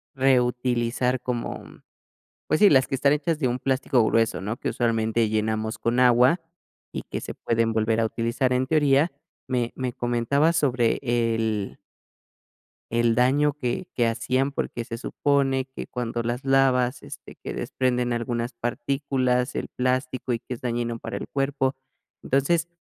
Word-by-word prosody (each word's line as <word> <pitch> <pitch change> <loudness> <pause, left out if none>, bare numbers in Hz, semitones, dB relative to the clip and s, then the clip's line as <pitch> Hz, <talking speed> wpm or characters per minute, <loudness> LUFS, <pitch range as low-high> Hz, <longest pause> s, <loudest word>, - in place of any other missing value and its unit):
reutilizar 125 -1 +1
como, 120 -2 -3
mm - - -16 0.7
pues 155 - +1
sí, 205 - +7
las 130 -2 +4
que - - -6
están 140 +2 +3
hechas 155 +1 -1
de 135 - +1
un 120 0 -1
plástico 130 -3 +1
grueso, 115 0 +2
¿no?, 105 +5 -3
que - - -3
usualmente 115 -1 +1
llenamos 110 0 -1
con 120 +2 0
agua 125 +6 +5 0.5
y - - -4
que - - -5
se - - -6
pueden 115 -1 0
volver 110 0 +1
a - - +2
utilizar 115 +3 -1
en 130 +1 +1
teoría, 145 +2 +3 0.4
me 125 -2 -1
me 125 -2 -3
comentaba 120 +6 +1
sobre 130 -7 +1
el 115 -4 0 1.1
el 115 0 +2
daño 140 +4 +3
que 140 +5 -3
que 120 - +2
hacían, 130 +4 0
porque 120 -3 -3
se 115 0 -6
supone 135 0 0
que - - -5
cuando 120 -1 -3
las 120 +3 -3
lavas, 130 -2 +2
este, - - -11
que - - -5
desprenden 125 -1 -1
algunas 120 0 -2
partículas, 125 +1 -1
el - - -3
plástico, 130 0 -1
y 115 - -1
que 125 - -6
es - - -13
dañino 120 -1 -2
para - - -6
el - - -5
cuerpo. 135 -1 0 0.5
Entonces 160 +5 +1
125 Hz, 160 wpm, -25 LUFS, 115-135 Hz, 1.1 s, sí